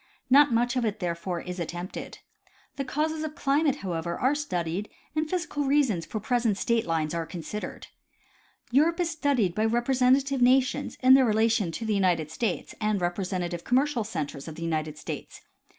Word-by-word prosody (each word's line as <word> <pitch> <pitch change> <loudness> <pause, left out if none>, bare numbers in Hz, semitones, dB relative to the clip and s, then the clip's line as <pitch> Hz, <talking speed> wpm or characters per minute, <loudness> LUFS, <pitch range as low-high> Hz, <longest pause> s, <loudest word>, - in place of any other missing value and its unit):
Not 285 +1 +7
much 240 +2 +1
of 250 - +1
it 215 -1 -1
therefore, 175 -1 -3
is 180 0 -6
attempted. 175 +2 -6 0.6
The 275 - -2
causes 310 +3 -1
of 310 -1 -5
climate 285 -1 +2
however, 170 -1 -2
are 260 +3 +3
studied 195 - -2 0.3
and 310 0 0
physical 330 -5 -2
reasons 270 - +2
for 215 - -4
present 230 -1 +1
state 230 0 0
lines 160 -2 0
are 165 -1 -2
consid 185 +4 -5
ered. - - -7 0.9
Europe 320 +7 +3
is 340 -1 +1
studied 280 - +1
by 215 - 0
representative 255 +3 +2
nations 255 +1 +2
in 260 +1 +8
their 265 0 +7
relation 220 -4 +2
to 225 - -4
the 220 - 0
United 175 -6 +1
States 200 +2 -2
and 215 -1 +1
representative 175 -1 -2
commercial 260 -1 +1
centers 155 -9 -5
of 160 - -7
the 165 - -7
United 155 -2 -2
States. - - -7
220 Hz, 170 wpm, -27 LUFS, 175-270 Hz, 0.9 s, in